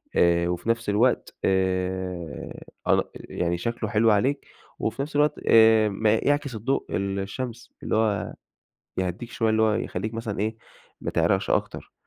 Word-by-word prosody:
آآ 85 0 +4
وفي 90 +5 -3
نفس 115 -1 0
الوقت 115 +5 +1
آآ 95 -3 -1 0.3
أن - - +4
يعني 85 0 -2
شكله 115 +3 -3
حلو 110 +1 +4
عليك 130 +8 +1 0.3
وفي - - -2
نفس 145 +2 -5
الوقت 150 +1 +3
آآ 110 -1 +6
م 100 +2 -6
يعكس 140 +5 +1
الضوء 130 +6 -1
ال 100 0 -1
الشمس، 120 +4 -5
اللي - - -1
هو 110 -2 0 0.7
يهّديك 95 +6 -3
شوية 115 -2 0
اللي 110 0 +2
هو 110 -1 +4
يخلّيك 110 0 -3
مثلًا 115 -3 -4
إيه، 110 +1 -1 0.4
ما - - -3
تعرقش - - +1
أكتر. - - -1
110 Hz, 155 wpm, -25 LUFS, 95-115 Hz, 0.7 s, آآ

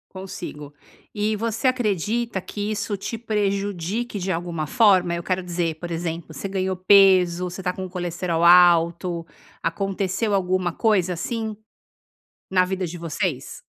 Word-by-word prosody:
Consigo. 160 -6 -8 0.4
E 215 0 0
você 230 +4 -2
acredita 230 -2 0
que 205 +2 -4
isso 210 -1 -2
te 230 - -4
prejudique 205 -1 -2
de 190 +1 -3
alguma 170 -2 -2
forma? 190 - +4
Eu 170 - -3
quero 185 +1 -1
dizer, 170 -2 -2
por 170 +2 -7
exemplo, 165 -1 -4
você 195 - -5
ganhou 190 -1 -1
peso, 185 -2 +5
você 180 +1 -6
tá 180 - -1
com 185 +1 -6
o - - -9
colesterol 175 -1 -2
alto, 170 0 +5 0.4
aconteceu 195 +4 -1
alguma 185 -1 +1
coisa 190 -3 +1
assim? 220 +4 -3 0.9
Na 185 -1 +3
vida 190 0 -2
de 175 - -7
vocês? 165 -3 -3
185 Hz, 145 wpm, -23 LUFS, 175-205 Hz, 0.9 s, peso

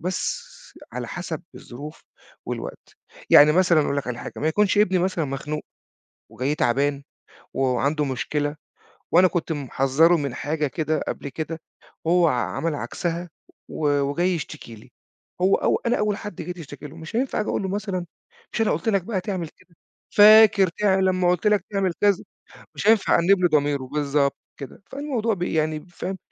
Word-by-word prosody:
بس 185 - -2 0.5
على - - -5
حسب - - -5
الظروف 145 +6 -10 0.4
والوقت. - - -7 0.3
يعني 150 +1 +8
مثلًا 175 -2 +4
أقول 145 -1 -1
لك 140 - -2
على 125 -1 -4
حاجة، - - -7
ما 155 - 0
يكونش 205 +4 +2
ابني 190 -3 +3
مثلًا 180 -3 0
مخنوق، 145 +2 -4 0.7
وجاي 135 +4 -1
تعبان، 140 +1 0 0.5
وعنده 135 +3 0
مشكلة، 145 +2 -2 0.6
وأنا 185 +2 +7
كنت 170 -2 -2
محذّره 145 +3 +2
من 140 -5 -3
حاجة 150 +3 -2
كده 155 +2 -1
قبل - - -4
كده، 160 +3 -5 0.4
وهو 170 +1 +4
ع - - +1 0.2
عمل 165 -2 -1
عكسها 170 +7 -4 0.4
و 145 -2 +1
وجاي 170 +7 0
يشتكي 150 -7 -7
لي، 105 - -16 0.5
هو 190 +2 +4
أو - - +1
أنا 240 +1 +2
أول 210 -1 0
حد 210 -2 -7
جاي 175 +2 -5
تشكتي 165 -4 -10
له، 150 - -12
مش 160 +5 -7
هينفع 255 -2 0
آجي 210 - -3
أقول - - -1
له 190 - -2
مثلًا 190 -2 -3 0.5
"مش - - -3
أنا 220 - +2
قُلت 165 +8 -2
لك 200 -4 +2
بقى 190 0 -2
تعمل 180 -3 -4
كده، 180 +1 -25 0.4
فاكر 210 -2 +7
ده 190 -2 +3
لمّا 185 -1 +2
قُلت 180 +3 -1
لك 210 -3 +3
تعمل 195 -3 +1
كذا؟" 200 -2 +2 0.5
مش - - -3
هينفع 220 -2 +4
أأنّب 190 +3 +4
له 180 - +5
ضميره، 145 -2 +1
بالضبط 140 +1 0 0.2
كده. 140 +7 -10
فالموضوع 265 -6 -1
بي 180 -3 -3
يعني 155 +1 -1
فاهم، 180 +2 -5
165 Hz, 170 wpm, -23 LUFS, 145-190 Hz, 0.7 s, يعني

